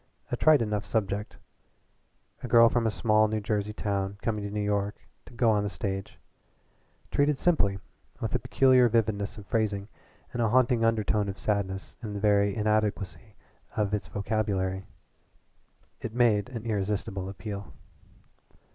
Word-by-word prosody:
A -, -, +1 dB
trite 155 Hz, -5 st, +5 dB
enough 105 Hz, -2 st, -2 dB
subject 105 Hz, -1 st, -2 dB, 1.0 s
a -, -, -5 dB
girl 115 Hz, -1 st, +7 dB
from 115 Hz, -1 st, +1 dB
a -, -, +3 dB
small 110 Hz, +2 st, +3 dB
New 110 Hz, 0 st, -1 dB
Jersey 105 Hz, -1 st, -1 dB
town 100 Hz, -2 st, -2 dB
coming 105 Hz, -3 st, -1 dB
to 100 Hz, -, -4 dB
New 105 Hz, 0 st, -2 dB
York 105 Hz, 0 st, -2 dB, 0.2 s
to -, -, -13 dB
go 115 Hz, -1 st, +3 dB
on 105 Hz, -1 st, +2 dB
the 100 Hz, -, -2 dB
stage 95 Hz, -1 st, -4 dB, 0.9 s
treated 145 Hz, 0 st, +2 dB
simply, 105 Hz, -, +2 dB, 0.4 s
with -, -, -3 dB
a -, -, +1 dB
peculiar 130 Hz, -2 st, +4 dB
vividness 105 Hz, -3 st, 0 dB
of 105 Hz, -, -10 dB
phrasing 105 Hz, -2 st, -1 dB, 0.4 s
and 120 Hz, -, -1 dB
a 115 Hz, -, +2 dB
haunting 120 Hz, -1 st, +3 dB
undertone 110 Hz, -2 st, +1 dB
of 95 Hz, -, -6 dB
sadness 95 Hz, -2 st, -2 dB
in 110 Hz, -3 st, -5 dB
the 100 Hz, -, -4 dB
very 100 Hz, -1 st, +3 dB
inadequacy 105 Hz, -1 st, -1 dB, 0.4 s
of 105 Hz, -1 st, 0 dB
its 105 Hz, -2 st, -2 dB
vocabulary, 100 Hz, -2 st, -2 dB, 1.1 s
it 115 Hz, 0 st, -5 dB
made 115 Hz, -3 st, +3 dB
an 115 Hz, -3 st, -7 dB
irresistible 100 Hz, -3 st, -2 dB
appeal. 100 Hz, +1 st, -7 dB
105 Hz, 150 wpm, -28 LUFS, 100-115 Hz, 1.1 s, girl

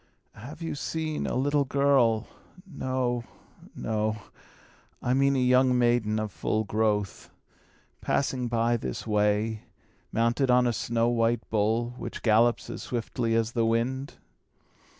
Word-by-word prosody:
"Have 140 Hz, +9 st, -10 dB
you 165 Hz, -, -3 dB
seen 155 Hz, +1 st, -3 dB
a -, -, -2 dB
little 145 Hz, +3 st, +2 dB
girl 130 Hz, -5 st, +2 dB, 0.4 s
no, 130 Hz, -7 st, -2 dB, 0.5 s
no, 110 Hz, 0 st, -1 dB, 0.8 s
I 125 Hz, -, 0 dB
mean 140 Hz, +1 st, +3 dB
a -, -, +1 dB
young 125 Hz, 0 st, +4 dB
maiden 120 Hz, -3 st, +2 dB
of 110 Hz, -1 st, -3 dB
full 110 Hz, +3 st, -1 dB
growth 105 Hz, -1 st, -1 dB, 0.7 s
passing 130 Hz, -2 st, 0 dB
by 120 Hz, 0 st, +1 dB
this 65 Hz, -, -5 dB
way, 105 Hz, +1 st, +1 dB, 0.5 s
mounted 115 Hz, +4 st, +1 dB
on 125 Hz, 0 st, +5 dB
a 120 Hz, -, +1 dB
snow 115 Hz, +2 st, 0 dB
white 115 Hz, 0 st, +1 dB
bull, 110 Hz, +3 st, +1 dB
which -, -, -7 dB
gallops 115 Hz, +2 st, +3 dB
as -, -, -6 dB
swiftly 115 Hz, -1 st, -2 dB
as 115 Hz, 0 st, +1 dB
the 115 Hz, -1 st, 0 dB
wind?" 120 Hz, +4 st, -1 dB
120 Hz, 130 wpm, -27 LUFS, 110-130 Hz, 0.8 s, on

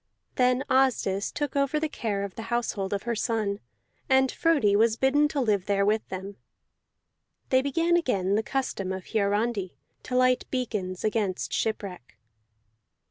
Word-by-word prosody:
Then 250 Hz, +1 st, +2 dB
Asdis 255 Hz, -7 st, +1 dB
took 290 Hz, -1 st, -3 dB
over 280 Hz, +2 st, +1 dB
the 315 Hz, -, 0 dB
care 215 Hz, -9 st, -3 dB
of 200 Hz, -2 st, -5 dB
the -, -, -7 dB
household 230 Hz, -5 st, -1 dB
of 200 Hz, 0 st, -2 dB
her 235 Hz, -, -1 dB
son, 215 Hz, -3 st, -1 dB, 0.5 s
and 265 Hz, 0 st, +4 dB
Frodi 285 Hz, -12 st, +2 dB
was 220 Hz, +1 st, +3 dB
bidden 290 Hz, +4 st, +3 dB
to 295 Hz, -1 st, -3 dB
live 210 Hz, -7 st, +1 dB
there 200 Hz, -1 st, +2 dB
with 215 Hz, +1 st, 0 dB
them. 190 Hz, +1 st, -6 dB, 1.1 s
They 260 Hz, 0 st, +4 dB
began 330 Hz, +5 st, +1 dB
again 200 Hz, -, +1 dB
the 215 Hz, -, +3 dB
custom 220 Hz, -6 st, -3 dB
of 190 Hz, +2 st, -7 dB
Hiarandi, 205 Hz, -1 st, 0 dB, 0.3 s
to 250 Hz, -, -5 dB
light 255 Hz, 0 st, +3 dB
beacons 210 Hz, -8 st, -3 dB
against 210 Hz, -4 st, -1 dB
shipwreck. 195 Hz, -, -3 dB
225 Hz, 150 wpm, -27 LUFS, 200-260 Hz, 1.1 s, and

